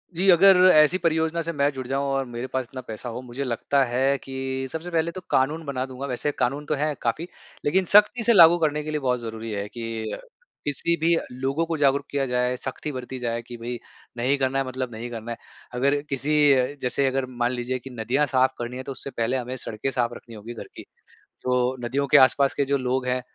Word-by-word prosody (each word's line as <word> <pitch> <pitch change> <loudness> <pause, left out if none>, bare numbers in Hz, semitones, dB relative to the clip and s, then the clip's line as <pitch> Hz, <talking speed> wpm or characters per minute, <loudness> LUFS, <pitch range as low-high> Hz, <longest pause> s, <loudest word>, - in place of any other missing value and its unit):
जी, 190 +3 +2
अगर 190 +2 +7 0.2
ऐसी 155 +4 +5
परियोजना 160 -1 0
से 165 +1 -3
मैं 140 -1 +2
जुड़ 130 -1 -6
जाऊँ 135 +1 -1
और 135 0 0
मेरे 120 +1 -6
पास 130 -1 -2
इतना 130 -1 -7
पैसा 115 +1 -7
हो 120 +2 -6
मुझे 125 +2 -5
लगता 135 +3 +1
है 135 +3 +1
कि 130 0 -4
सबसे 160 +2 -5
पहले 165 0 +1
तो 185 - -8
कानून 150 +5 +1
बना 130 -2 -2
दूँगा 130 +1 -7
वैसे 130 +3 -1
कानून 140 +4 0
तो 155 - 0
है 150 +1 0
काफ़ी 150 +9 -1 0.4
लेकिन 185 +6 +2
सख्ती 210 +5 +5
से 235 - +4
लागू 170 -2 +8
करने 150 -1 0
के 155 - -6
लिए 150 - -1
बहुत 125 -2 0
ज़रूरी 115 -1 -6
है 100 -1 -3
कि, 115 -1 -5 0.5
किसी 145 +4 +1
भी 170 +1 +4 0.2
लोगों 135 +6 -1
को 165 -1 -2
जागरूक 140 -1 +2
किया 140 -1 0
जाए 125 0 0
सख्ती 130 +4 -5
बरती 130 -1 -6
जाए 120 -1 -2
कि 120 0 -10
भई 120 +1 -5 0.4
नहीं 130 +4 +1
करना 135 0 0
है 135 - 0
मतलब 130 -1 -4
नहीं 115 +2 -6
करना 115 0 -6
है। 115 - -5 0.4
अगर 140 +3 +2
किसी 140 +3 -1 0.5
जैसे 130 +2 0
अगर 135 0 0 0.2
मान 120 - +2
लीजिए 125 +1 -3
कि 135 - -10
नदियाँ 125 +4 0
साफ़ 130 -2 +2
करनी 120 +1 -5
है 130 - -5
तो 140 - -6
उससे 135 +1 -7
पहले 120 +1 -1
हमें 125 +1 -4
सड़कें 110 +2 -3
साफ 120 -2 0
रखनी 115 -1 -11
होगी 110 +3 -8
घर 115 - -9
की, - - -9 0.6
तो 125 0 +1
नदियों 140 +3 0
के - - +5
आस-पास 135 +1 +4
के 140 - +1
जो 140 +1 +1
लोग 130 0 -1
हैं। 125 0 0
130 Hz, 225 wpm, -24 LUFS, 125-145 Hz, 0.6 s, लागू